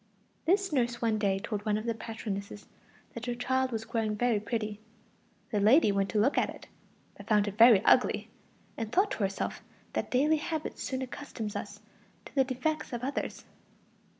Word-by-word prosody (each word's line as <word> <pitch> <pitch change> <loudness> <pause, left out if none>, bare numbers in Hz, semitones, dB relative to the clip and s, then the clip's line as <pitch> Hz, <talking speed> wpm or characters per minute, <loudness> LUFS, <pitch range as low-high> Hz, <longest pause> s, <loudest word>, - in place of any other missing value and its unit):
This 385 +1 +2
nurse 240 -3 +1
one 225 -2 +1
day 195 -2 +2
told 205 +1 -4
one 210 -1 +1
of 215 - -5
the 230 - 0
patronesses 210 -2 -6 0.5
that 235 - -6
the 245 0 -3
child 260 +1 0
was 225 -1 -3
growing 220 -2 -1
very 235 -1 +2
pretty. 215 0 -3 0.7
The 210 - +1
lady 215 +4 +5
went 195 -1 0
to 210 - +1
look 255 +7 +3
at - - +1
it, - - -10 0.5
but - - -12
found 210 -2 +3
it 205 - -4
very 225 -3 +7
ugly, - - +4 0.5
and 225 -1 -4
thought 395 +3 +3
to - - -3
herself 195 -2 -2 0.3
that - - -2
daily 295 +5 +3
habit 315 0 -4
soon 260 -1 -3
accustoms 240 -5 -6
us 205 +1 -6 0.4
to - - -12
the 270 - +4
defects 260 +3 -2
of 240 0 -4
others. 275 +2 -3
230 Hz, 180 wpm, -30 LUFS, 210-260 Hz, 0.7 s, very